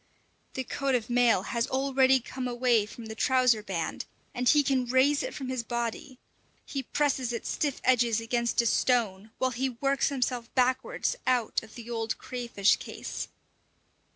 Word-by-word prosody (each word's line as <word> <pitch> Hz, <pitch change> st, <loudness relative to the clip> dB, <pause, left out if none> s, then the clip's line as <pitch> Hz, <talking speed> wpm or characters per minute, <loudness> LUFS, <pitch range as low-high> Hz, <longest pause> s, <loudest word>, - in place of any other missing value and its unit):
The 260 Hz, -, -2 dB
coat 275 Hz, +1 st, -1 dB
of 240 Hz, 0 st, -2 dB
mail 240 Hz, -5 st, +4 dB
has 235 Hz, +1 st, -1 dB
already 265 Hz, 0 st, +3 dB
come 255 Hz, +1 st, -5 dB
away 240 Hz, -3 st, +2 dB
from 230 Hz, +2 st, -10 dB
the 220 Hz, -, -6 dB
trouser 250 Hz, -1 st, +3 dB
band, 180 Hz, -6 st, -3 dB, 0.3 s
and 250 Hz, 0 st, +1 dB
he 295 Hz, -1 st, +5 dB
can 260 Hz, -2 st, +1 dB
raise 265 Hz, +3 st, +3 dB
it -, -, -5 dB
from 270 Hz, -, -5 dB
his 255 Hz, -2 st, -1 dB
body; 240 Hz, +3 st, -4 dB, 0.5 s
he 275 Hz, -, -3 dB
presses 265 Hz, -2 st, 0 dB
its 235 Hz, -, -4 dB
stiff 290 Hz, -3 st, -1 dB
edges 240 Hz, -3 st, +3 dB
against 235 Hz, +1 st, 0 dB
a -, -, -4 dB
stone, 220 Hz, -4 st, +1 dB
while 260 Hz, 0 st, 0 dB
he 260 Hz, +2 st, -1 dB
works 275 Hz, +3 st, 0 dB
himself 250 Hz, -3 st, -2 dB
backwards 260 Hz, -, +1 dB
out 250 Hz, -3 st, +1 dB
of 220 Hz, -1 st, -14 dB
the 235 Hz, -2 st, -9 dB
old 225 Hz, -1 st, -2 dB
crayfish 235 Hz, -5 st, +1 dB
case. -, -, -6 dB
245 Hz, 165 wpm, -28 LUFS, 230-260 Hz, 0.5 s, he